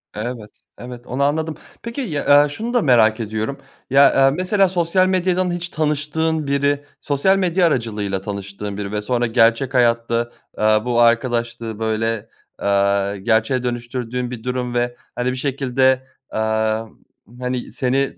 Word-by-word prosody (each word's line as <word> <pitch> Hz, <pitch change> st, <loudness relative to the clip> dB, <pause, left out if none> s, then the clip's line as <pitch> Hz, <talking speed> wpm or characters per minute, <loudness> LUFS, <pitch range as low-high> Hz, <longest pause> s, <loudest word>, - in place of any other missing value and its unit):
Evet, 110 Hz, 0 st, -5 dB, 0.3 s
evet 125 Hz, 0 st, -10 dB
onu 130 Hz, +3 st, -1 dB
anladım. 155 Hz, +2 st, 0 dB, 0.3 s
Peki, 235 Hz, +4 st, -4 dB
ya, 145 Hz, -, +4 dB
eee, 150 Hz, -, -1 dB
şunu 225 Hz, +11 st, -5 dB
da 245 Hz, -, +3 dB
merak 115 Hz, -, +4 dB
ediyorum. 110 Hz, +4 st, -3 dB, 0.3 s
Ya, 140 Hz, +2 st, +6 dB
eee, 135 Hz, 0 st, +5 dB
mesela 195 Hz, +1 st, +2 dB
sosyal 180 Hz, +1 st, +2 dB
medyadan 185 Hz, -1 st, +1 dB
hiç 175 Hz, +1 st, -4 dB
tanıştığın 155 Hz, 0 st, -1 dB
biri 140 Hz, +1 st, +1 dB, 0.2 s
sosyal 150 Hz, +7 st, +2 dB
medya 180 Hz, -1 st, +2 dB
aracılığıyla 105 Hz, -, -2 dB
tanıştığın 100 Hz, 0 st, -6 dB
biri 100 Hz, -1 st, -4 dB
ve 105 Hz, 0 st, -2 dB
sonra 120 Hz, +2 st, 0 dB
gerçek 115 Hz, +3 st, +3 dB
hayatta, 115 Hz, -1 st, +1 dB, 0.3 s
aaa, 110 Hz, +1 st, +3 dB
bu 120 Hz, -1 st, +2 dB
arkadaşlığı, 115 Hz, -1 st, +1 dB
böyle, 110 Hz, 0 st, -1 dB, 0.3 s
aaa, 100 Hz, 0 st, +1 dB
gerçeğe 110 Hz, +5 st, +1 dB
dönüştürdüğün 120 Hz, 0 st, -3 dB
bir 120 Hz, -3 st, -7 dB
durum 125 Hz, -1 st, -2 dB
ve, 120 Hz, 0 st, 0 dB, 0.2 s
hani, 125 Hz, +1 st, 0 dB
bir 130 Hz, -, -4 dB
şekilde, 130 Hz, -1 st, +1 dB, 0.3 s
amm, 110 Hz, 0 st, -1 dB, 0.4 s
hani, 125 Hz, 0 st, -3 dB
seni 135 Hz, +1 st, -1 dB
125 Hz, 145 wpm, -20 LUFS, 110-145 Hz, 0.4 s, Ya